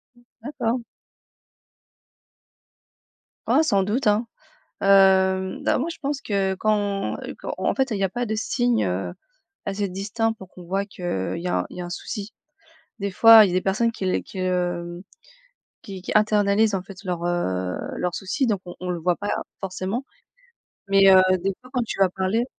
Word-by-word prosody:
Mmh. 240 - -23 0.2
D'accord. 245 -4 -2 2.7
Ah, 315 - +4
sans 200 -10 +2
doute, 220 +6 -1
hein. 210 +3 +2 0.5
Hem, 190 -1 +4
bah, - - +2
moi 295 - -1
je - - -14
pense 280 -1 -2
que, 195 -2 0
quand, 205 0 0
heu, - - -6
quand - - -5
en - - 0
fait 265 -1 0
il 200 - -1
y - - -2
a - - +2
pas 245 +5 -3
de 220 - -2
signe, 240 +2 +1
heu, 90 - -2 0.5
assez 200 0 -2
distinct 205 +4 -1
pour 190 -4 -13
qu'on 180 - -13
voit 195 +3 -1
qu'il 185 -3 -11 0.4
y 175 - -5
a - - 0
il - - -11
y - - -5
a 175 - -4
un - - -8
souci. 205 +3 -6 0.7
Des 200 0 -2
fois 225 +3 +9
il - - 0
y - - -3
a - - -3
des 185 - +2
personnes 215 +5 +1
qui 200 - -5
l 185 - +1
qui 190 - -12
le, - - -1
hem, 175 -1 -2 0.8
qui 190 -2 -8
qui - - -5
internalisent 210 0 +3
en 185 - -3
fait 195 -1 -12
leurs, 180 -3 -3
heu, 95 - -1 0.2
leurs 180 -1 -2
soucis, 215 +8 -1
donc 205 -5 0
on 175 - -9
on 180 - -5
le 175 -1 -2
voit 175 +2 +1
pas 205 +3 -5 0.3
forcément. 195 +6 -3 0.8
Mais, 195 0 +6
heu, 185 - +8 0.2
des 195 - 0
fois 255 - -15
quand 250 - +1
tu 215 - -5
vas 195 -2 +5
parler 190 +5 0
195 Hz, 195 wpm, -23 LUFS, 185-220 Hz, 2.7 s, fois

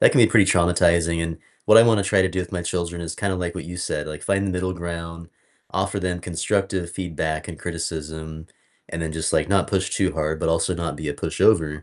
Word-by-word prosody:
that - - +6
can 130 - +5
be 110 - +8
pretty 105 -4 +4
traumatizing, 85 -1 +3
and 80 0 -4 0.3
what - - +8
I - - +10
want 115 -2 +4
to 100 - 0
try 100 -2 +4
to 95 - +2
do 95 0 -2
with 90 - -7
my 90 - -2
children 85 0 -3
is 85 -1 -5
kinda 100 -2 -1
like 90 -1 -3
what - - -6
you 90 +1 -7
said, 75 -3 -2
like, 75 -1 -7
find 100 0 +1
the - - -1
middle 90 0 -1
ground, 85 -1 -6 0.4
offer 100 +1 -1
them 90 -1 -2
constructive 90 +1 -1
feedback 80 -3 -3
and 80 - -7
criticism, 80 -1 -5 0.4
and 85 0 -4
then 80 - -2
just, 80 0 -1
like, - - +2
not 100 -2 +3
push 95 -1 0
too 95 -2 +1
hard, 80 0 -1
but - - 0
also 85 +2 +1
not 85 -3 -3
be 75 0 -5
a 75 - -2
pushover. 80 -4 +2
85 Hz, 240 wpm, -23 LUFS, 80-95 Hz, 0.4 s, I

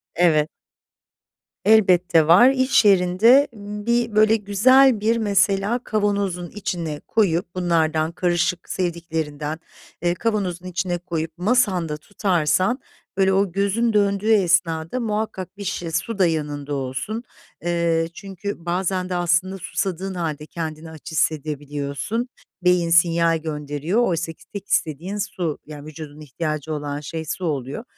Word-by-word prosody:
Evet. 155 -3 +3 1.2
Elbette 180 -7 +4
var. 190 +10 +7
İş 260 -4 +3
yerinde 200 +8 +5
bir 210 +2 -2
böyle 215 +1 +5
güzel 225 +4 +4
bir, 225 +2 +1
mesela, 200 +1 +1
kavanozun 200 -4 -1
içine 170 -7 -4
koyup 180 -5 +1
bunlardan 165 -3 +1
karışık 175 0 -1
sevdiklerinden, 160 -4 -3 0.4
eee, 175 0 +1
kavanozun 190 -5 -2
içine 175 0 -2
koyup 165 -2 -4
masanda 185 -7 +1
tutarsan 185 - 0 0.4
böyle 190 -1 +3
o 195 -1 +2
gözün 200 +5 +1
döndüğü 205 +1 +2
esnada 170 +1 +1
muhakkak 210 -4 -3
bir 205 - -6
şişe 175 -3 -3
su 195 +7 -2
da 185 - +5
yanında 145 -3 -3
olsun. 135 - -4 0.4
Eee, 170 -1 +1
çünkü 195 -2 -7
bazen 185 +1 -1
de, 180 - -2
aslında, 175 +2 +1
susadığın 190 0 -3
hâlde 155 -4 -3
kendini 160 -1 -6
aç 160 0 -10
hissedebiliyorsun. 150 - -2 0.3
Beyin 180 -1 +3
sinyal 170 0 +4
gönderiyor. 150 +5 -2
Oysaki 165 -2 -3
tek 205 -1 -9
istediğin 170 +6 -1
su, 180 -6 -3
yani, 150 -1 -10
vücudun 155 -1 -9
ihtiyacı 155 +1 -4
olan 145 -1 -4
şey 160 +2 -6
su 180 +4 -4
oluyor. 140 - -3
175 Hz, 125 wpm, -22 LUFS, 160-200 Hz, 1.2 s, var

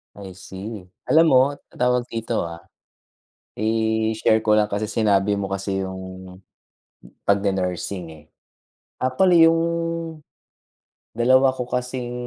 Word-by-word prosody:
I 95 -3 -10
see. 95 +2 -8 0.2
Alam 165 +2 +5
mo, 130 0 +7 0.3
tawag 125 0 +1
dito 115 -5 -2
ah, 85 0 -7 0.9
i-share 110 0 +1
ko 105 -1 +2
lang, 105 - +4
kasi, 105 +1 -2
sinabi 105 -2 +1
mo 100 - -3
kasi 95 0 -2
yung 95 0 -9 0.9
"pag 100 0 +3
ne-nursing" 95 -2 -2
eh. 75 -1 -16 0.8
Actually 165 +5 +5
yung 165 0 +1 1.6
dalawa 130 +3 +4
ko 125 - -3
kasing 125 0 -4
110 Hz, 115 wpm, -22 LUFS, 95-125 Hz, 1.6 s, mo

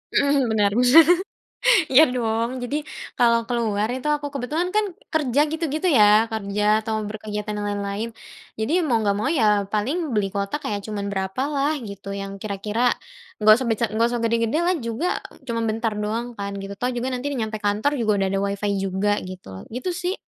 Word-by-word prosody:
Heeh. 280 -2 +3
Bener, 205 -2 +2
bener. 250 +7 +8 0.9
Iya, 265 +4 +8
dong. 230 -1 0
Jadi, 245 +4 -2 0.4
kalau 235 -1 +4
keluar 220 -3 0
itu, 255 +3 -4
aku 295 -1 0
kebetulan 300 +7 -1
kan 425 +2 +2 0.3
kerja, 290 -4 +1
gitu-gitu 320 +2 -1
ya, 215 -3 +5
kerja 210 -2 -2 0.2
atau 220 0 -2
berkegiatan 210 0 -5
lain-lain. 205 +2 -3 0.4
Jadi, 220 +6 -2
mau 230 -5 +2
nggak 200 -1 +1
mau 215 - -1
ya 215 -9 +2
paling 255 - -1
beli 200 -2 +1
kuota 200 +5 -2
kayak 205 -1 -3
cuman 205 -2 -4
berapa 190 +5 -2
lah 285 +1 +1
gitu, 200 -2 -7
yang 195 0 -6
kira-kira 210 +4 0 0.5
nggak 215 0 +8
usah 260 - -3
besa 225 0 +1
nggak 225 +2 +2
usah 240 - -2
gede-gede 230 +4 +1
lah 360 +2 +2
juga, 230 +5 -3 0.4
cuma 235 -3 -3
bentar 225 0 -1
doang 215 +3 -2
kan, 200 0 -4
gitu. 195 0 -6
Toh, 250 +3 0
juga 245 +1 -2
nanti 255 +1 -3
nyampe 220 -3 -3
kantor 210 +6 +1
juga 220 -3 +2
udah 195 - +1
ada 195 - 0
Wi-Fi 200 +1 -2
juga, 195 +1 0
gitu 185 0 -9
loh. 95 0 -8
Gitu, 250 +9 -4
sih. 355 +1 -2
225 Hz, 180 wpm, -23 LUFS, 205-255 Hz, 0.9 s, bener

